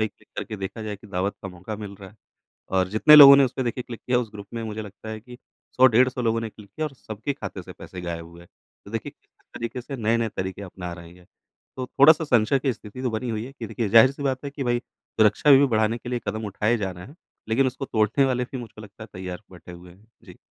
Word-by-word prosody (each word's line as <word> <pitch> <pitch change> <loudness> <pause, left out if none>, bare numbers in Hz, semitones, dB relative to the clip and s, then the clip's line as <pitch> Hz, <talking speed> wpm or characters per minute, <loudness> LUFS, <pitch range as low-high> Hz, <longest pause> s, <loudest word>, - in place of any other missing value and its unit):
भई 110 - +2
क्लिक - - -28
करके 110 - -5
देखा 100 +3 -6
जाए 105 -1 -5
कि 105 - -16
दावत 100 +1 -2
का 95 - -5
मौका 90 +4 -8
मिल 105 -1 -8
रहा 95 - -9
है। - - -22 0.6
और 95 0 +1
जितने 110 +10 +7
लोगों 140 -2 +12
ने 140 - +6
उसपे 130 +1 -2
देखिए 125 +1 -3
क्लिक 120 -3 -8
किया 125 -1 +3
उस 115 -4 -3
ग्रुप 100 -1 -9
में 115 - -3
मुझे 110 0 -5
लगता 105 +2 -11
है 110 0 -6
कि 125 +2 -13 0.4
100-150 125 0 +4
लोगों 115 0 +1
ने 115 - -4
क्लिक 105 -1 -15
किया 155 +8 -3
और 145 - -8
सब 110 -4 -10
खाते 140 - -4
से - - -11
पैसे 90 - -10
गायब 85 -1 -5
हुए 85 +1 -15
हैं। 85 - -17 0.4
तो 100 - -12
देखिए 115 -2 -4
किस - - -42 0.3
तरीके 115 +2 -5
से 135 +2 -7
नए-नए 115 0 +1
तरीके 95 +2 -4
अपना 90 -2 -7
रहे 85 0 -11
हैं। 90 -1 -20 0.5
तो 130 -1 -4
थोड़ा-सा 155 +5 +5
संशय 125 0 +3
की 130 -1 0
स्थिति 110 +3 -10
तो 125 - 0
बनी 110 +3 -3
हुई 110 0 -3
है 135 - -10
कि 115 - -5
देखिए 110 +1 -3
ज़ाहिर-सी 130 +7 +5
बात 135 0 -2
है 140 - -4
कि 140 -1 -5
भई 120 -1 +1
सुरक्षा 110 +6 0
भी 135 +1 +7
बढ़ाने 110 -1 +1
के 120 - -9
लिए 125 -1 -2
कदम 110 0 -3
उठाए 105 +4 0
जा 100 -4 -3
रहे 90 +1 -10
हैं। 145 - -15 0.3
लेकिन 130 +4 +2
उसको 130 +2 -3
तोड़ने 110 +4 +2
वाले 125 -1 0
भी 130 - -4
मुझको 115 -2 -10
लगता 105 +1 -13
है 110 - -10
तैयार 90 +1 -7
बैठे 90 0 -12
हुए 90 +1 -13
हैं। 100 +4 -23 0.2
जी। - - -14
110 Hz, 260 wpm, -24 LUFS, 100-125 Hz, 0.6 s, लोगों